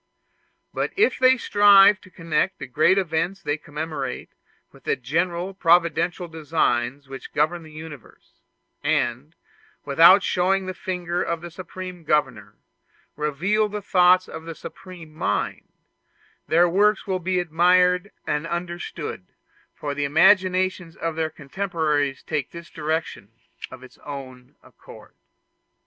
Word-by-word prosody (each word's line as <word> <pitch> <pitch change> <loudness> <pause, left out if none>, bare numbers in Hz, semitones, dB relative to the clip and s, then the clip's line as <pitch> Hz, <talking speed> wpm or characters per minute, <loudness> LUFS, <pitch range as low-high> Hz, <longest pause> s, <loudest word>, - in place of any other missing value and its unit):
But - - -2
if 425 +3 +2
they 260 0 +5
strive 205 -2 +6
to 185 - -16
connect 165 +1 -1
the - - -7
great 155 +9 +3
events 175 +1 -1
they 145 - 0
commemorate 155 +1 -6 0.4
with - - -19
the - - +1
general 170 +8 -2
providential 175 0 +2
designs 145 -5 -1
which 135 0 -10
govern 155 +3 0
the 160 -1 -14
universe, 155 -4 -13 0.4
and, 125 +7 -1 0.5
without 165 +7 +6
showing 190 +1 +1
the 185 - -4
finger 180 -1 -3
of 170 -1 -2
the 175 0 -9
Supreme 185 0 -9
Governor, 150 -1 -1 0.6
reveal 180 +9 0
the 210 +1 -4
thoughts 185 -1 +4
of 160 - -9
the 165 -1 -7
Supreme 180 -5 -11
Mind, 105 -9 -2 0.8
their 170 +2 +4
works 205 +4 +2
will 190 -2 -1
be 185 +1 -1
admired 180 +3 +3 0.2
and 150 +2 -2
understood, 170 - -5 0.5
for 145 -1 -4
the 145 0 -2
imagination 185 +2 +2
of 165 -1 -3
their 160 -1 -1
contemporaries 150 -2 -2
takes 150 -4 -3
this 170 0 -10
direction 155 -9 -4 0.4
of 130 0 -12
its 130 -1 -16
own 130 -3 -10
accord. - - -16
170 Hz, 130 wpm, -23 LUFS, 150-185 Hz, 0.8 s, strive